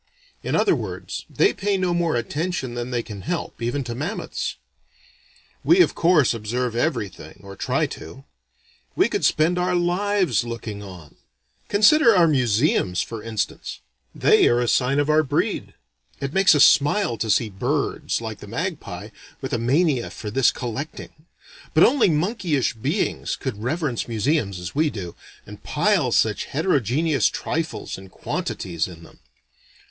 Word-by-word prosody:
In - - -2
other - - +3
words, - - -6
they 400 - +2
pay 200 0 0
no 185 -2 0
more 170 -3 +1
attention 145 +1 -2
than 120 0 -4
they 120 -2 -1
can 100 -3 -8
help, 170 - -4
even 120 +4 -1
to 120 -1 -5
mammoths. 155 - -4 1.1
We 360 +2 +5
of - - +3
course 165 -7 +3
observe 115 +2 -2
everything, 115 - -3
or 100 0 -10
try 130 +10 0
to. 135 - -11 0.7
We - - +4
could - - -2
spend 165 +3 +2
our 180 0 +1
lives 180 - +1
looking 115 -3 -6
on. 90 -7 -12 0.5
Consider 225 +4 +5
our 175 -2 +5
museums 120 - +2
for 115 -2 -7
instance: 110 -1 -4 0.3
they - - +5
are 120 - +3
a 120 - 0
sign 130 +3 +2
of 145 0 +2
our 155 0 +4
breed. 145 - -2 0.4
It 140 +1 -4
makes 195 -3 +5
us 145 - +7
smile 145 - +3
to 110 - -2
see 110 +1 +2
birds, 95 - -1
like - - -6
the - - -11
magpie, - - -5 0.3
with 135 0 -5
a 120 - +1
mania 135 +2 +1
for 105 - -7
this 135 +3 +4
collecting 125 +5 -5 0.6
but - - +7
only 255 -6 +4
monkeyish 165 - 0
beings 140 - -2
could 115 -6 -5
reverence 140 0 -2
museums 110 - 0
as 90 -1 -6
we 155 +2 +2
do, 90 -9 -6 0.3
and - - -11
pile - - +1
such - - +2
heterogeneous 145 - +1
trifles 160 -9 -3
and 95 0 -13
quantities 85 -2 -3
in 85 -2 -12
them. - - -17
135 Hz, 155 wpm, -23 LUFS, 115-170 Hz, 1.1 s, us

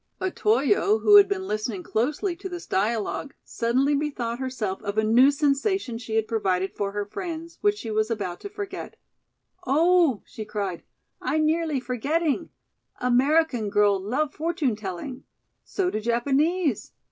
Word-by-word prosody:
Otoyo, 370 - +2
who 415 -1 +8
had 405 -1 +8
been 390 -1 -2
listening 215 -3 -3
closely 300 - -1
to 380 +2 -7
this 350 -1 -7
dialogue, 220 +7 -1
suddenly 255 +5 +1
bethought 260 -5 -2
herself 245 -7 -3
of 205 0 -4
a 220 - +3
new 240 +5 +6
sensation 285 - 0
she 225 -2 -5
had 220 -1 +1
provided 190 -4 0
for 200 -1 -2
her 205 0 -3
friends, 335 - -6
which 415 0 +2
she 225 - -6
was 215 +1 +1
about 195 -6 -3
to 405 - -7
forget. 405 -1 -7 0.7
"Oh," 320 - +3
she 220 - -8
cried, 200 -4 -4 0.4
"I - - 0
nearlee 310 -2 +1
forgetting. 280 +6 -1 0.5
American 250 -2 +2
girl 205 -1 +3
love 265 +10 -1
fortune 310 -6 -1
telling? 210 +6 -6 0.4
So 370 -2 -1
do - - -2
Japanese. 275 - 0
260 Hz, 145 wpm, -25 LUFS, 215-330 Hz, 0.7 s, who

